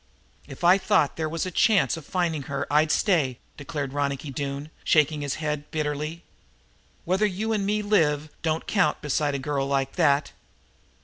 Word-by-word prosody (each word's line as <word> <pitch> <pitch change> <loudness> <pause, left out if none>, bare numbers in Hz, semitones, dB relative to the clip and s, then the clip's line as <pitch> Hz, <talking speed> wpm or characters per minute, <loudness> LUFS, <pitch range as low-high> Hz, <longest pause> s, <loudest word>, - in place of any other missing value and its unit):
"If - - -11
I 180 +3 +6
thought 195 -8 +2
they 160 -1 -2
was 165 +3 -2
a 185 - -4
chance 210 +2 +3
of 165 -3 -10
finding 170 -5 -1
her 140 -1 -2
I'd 155 +1 +3
stay," 150 - +2 0.2
declared 145 -2 -5
Ronicky, 140 0 -2 0.5
shaking 150 0 +3
his 145 -2 -2
head 150 -1 -3
bitterly. 155 +2 -3 0.8
"Whether 190 +5 +2
you 210 +3 -2
and 200 -2 -1
me 210 +1 0
live, 155 -7 +1
don't 160 0 -1
count 185 -8 +1
beside 145 0 0
a - - 0
girl 135 0 -2
like 135 +1 -1
that. 145 -4 +3
155 Hz, 165 wpm, -25 LUFS, 145-180 Hz, 0.8 s, I